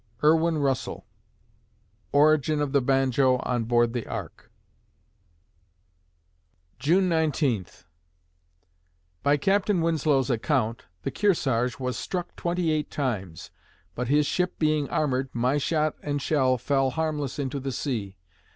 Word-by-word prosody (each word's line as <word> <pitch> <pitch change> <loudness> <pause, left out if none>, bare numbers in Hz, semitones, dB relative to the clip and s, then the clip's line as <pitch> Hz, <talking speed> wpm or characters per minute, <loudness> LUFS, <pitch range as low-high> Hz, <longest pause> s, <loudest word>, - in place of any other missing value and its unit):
IRWIN 160 +1 +4
RUSSELL 135 -3 -2 1.1
(Origin 150 +1 +3
of 145 -2 -1
the 140 -1 +3
Banjo 130 0 +2
on 120 -2 -1
Board 120 0 +2
the 120 -3 -4
Ark) - - -7 2.3
June 180 +6 +3
Nineteenth 150 - -1 1.4
By 145 +1 +3
Captain 195 +3 +1
Winslow's 150 -5 +1
account, 115 - -1 0.2
the - - -2
Kearsarge 130 - +1
was 125 -1 -3
struck 180 -2 -4
twenty 170 -1 -1
eight 155 -1 -1
times; 100 - -4 0.4
but 125 0 -3
his 145 +3 +3
ship 180 +4 -1
being 155 -3 +1
armored, 135 -3 0
my 125 +5 +1
shot 155 +1 0
and 145 -1 -2
shell 130 -3 +2
fell 135 +2 +1
harmless 150 -2 -2
into 140 -1 -3
the 135 0 -4
sea. 115 -7 -3
140 Hz, 120 wpm, -26 LUFS, 125-155 Hz, 2.3 s, IRWIN